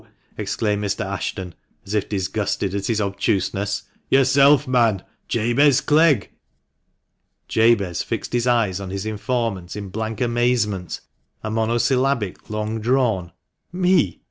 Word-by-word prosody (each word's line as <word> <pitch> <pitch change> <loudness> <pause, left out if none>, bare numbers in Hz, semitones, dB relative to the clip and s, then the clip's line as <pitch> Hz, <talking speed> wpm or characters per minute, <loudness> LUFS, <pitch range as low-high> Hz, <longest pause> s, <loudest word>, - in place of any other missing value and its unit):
" - - -39
exclaimed 105 -2 -1
Mr. 100 -2 -2
Ashton, 95 -2 -4 0.3
as 100 - -6
if 105 -2 0
disgusted 100 0 -2
at 100 -1 -2
his 115 -2 0
obtuseness. 100 0 -1
" - - -43
Yourself, 135 +1 +5
man 115 -6 +2
— - - -47
Jabez 120 +5 +3
Clegg." 150 -4 +3 1.2
Jabez 110 -6 +2
fixed - - -4
his 120 0 +1
eyes 110 -6 +2
on 100 -1 -6
his 95 +1 -4
informant 110 -4 -2
in 100 -2 -6
blank 110 +3 -4
amazement, 120 -6 0 0.4
a 110 - -3
monosyllabic 115 0 0
long 110 +1 -3
drawn 115 -7 +1 0.2
" - - -52
Me 180 - +2
110 Hz, 135 wpm, -22 LUFS, 100-125 Hz, 1.2 s, Yourself